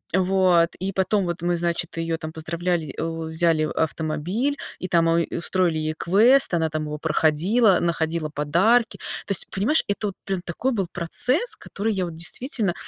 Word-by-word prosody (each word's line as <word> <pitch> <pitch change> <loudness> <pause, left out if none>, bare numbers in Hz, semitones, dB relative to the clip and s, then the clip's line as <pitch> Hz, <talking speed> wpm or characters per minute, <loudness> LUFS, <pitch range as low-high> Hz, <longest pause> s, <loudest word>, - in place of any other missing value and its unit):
Вот. 185 -2 +2
И 190 +1 -3
потом 190 +1 0
вот 175 -1 -4
мы 175 0 0
значит 170 0 -2
ее 165 0 -2
там 155 -1 -7
поздравляли, 165 -1 -3
э, - - -3 0.3
взяли 160 -1 +1
автомобиль, 165 - -2 0.2
и 185 - -4
там 170 -3 +2
у 165 - +2 0.2
устроили 175 -1 0
ей 155 0 -3
квест, 225 +6 +4
она 160 -2 +1
там 155 0 -4
его 150 0 -5
проходила, 170 +7 +2
находила 165 -2 -2
подарки. 185 +12 +1 0.3
То - - -4
есть 185 - +2
понимаешь, 225 +12 +3
это 205 +1 -2
вот 195 - -6
прям 190 -2 -3
такой 220 +10 -2
был 200 -5 -1
процесс, 250 - +4
который 215 +2 -4
я 185 -2 -2
вот, 170 - -7
действительно, 205 - +1
175 Hz, 170 wpm, -23 LUFS, 160-195 Hz, 0.3 s, квест